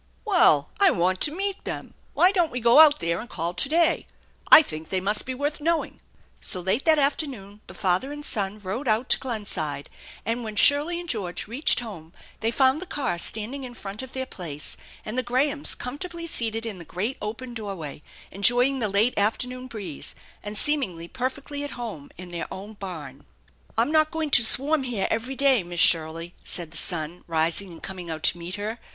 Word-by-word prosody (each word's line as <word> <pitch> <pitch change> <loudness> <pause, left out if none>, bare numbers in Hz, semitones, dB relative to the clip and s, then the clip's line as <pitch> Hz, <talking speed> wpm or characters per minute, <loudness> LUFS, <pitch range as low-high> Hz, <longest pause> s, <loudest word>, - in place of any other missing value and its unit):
" - - -36
Well, 395 -5 +4
I 395 -1 +6
want 185 - 0
to 295 - +3
meet 390 +4 -3
them. - - -6 0.2
Why 365 - +5
don't 350 -5 +2
we 250 - -3
go 235 +4 +5
out 305 -2 +7
there 170 +1 -1
and 235 - -8
call 170 -4 -3
to 275 - 0
day? 330 +1 +2 0.4
I 320 - +11
think 155 - -8
they 190 - 0
must 205 +5 -1
be 260 - -3
worth 290 +3 -3
knowing." 335 +1 -1 0.4
So 185 - -2
late 190 +8 -1
that 320 -1 +5
afternoon 260 -8 -1
the - - -12
father 185 +8 0
and 295 0 -7
son 205 -2 -1
rode 210 +7 -5
out 225 +3 +1
to - - +4
Glenside, 200 - -4 0.3
and 235 +2 -2
when 215 -1 -6
Shirley 295 +9 +4
and 350 - -8
George 200 - -3
reached 250 +4 +3
home 175 -8 -9 0.3
they 225 - 0
found 265 +4 +2
the 375 - -7
car 260 - -2
standing 230 +9 +1
in 245 -1 -8
front 205 +1 -7
of 260 0 -10
their 260 0 -3
place, 155 - -6 0.3
and 225 +4 -3
the - - +1
Grahams 275 +4 +1
comfortably 335 +6 -6
seated 225 -7 -1
in 210 -5 -5
the - - -9
great 190 - -3
open 235 +4 -6
doorway, 195 -11 -6 0.3
enjoying 245 +7 +4
the 215 -4 0
late 210 +5 +3
afternoon 250 +5 -1
breeze, 200 - -6 0.3
and 210 0 -6
seemingly 220 - +1
perfectly 270 +5 -4
at 290 - -6
home 215 -12 -7
in 180 0 -9
their 170 -1 -5
own 200 +3 -8
barn. 160 -10 -8 0.3
" - - -32
I'm 235 +6 +2
not 310 -1 +4
going 315 -2 -3
to 245 - +7
swarm 280 +6 +6
here 240 -7 -2
every 250 +4 -2
day, 270 -4 +4
Miss 175 -1 -5
Shirley," 165 +1 +3
said 170 -3 +1
the 165 - -7
son, 165 +1 -3
rising 165 +3 0
and 165 - -13
coming 185 -3 -7
out 160 -1 -5
to 175 - +1
meet 170 +2 -6
her. 215 +3 -5
225 Hz, 205 wpm, -25 LUFS, 180-275 Hz, 0.4 s, I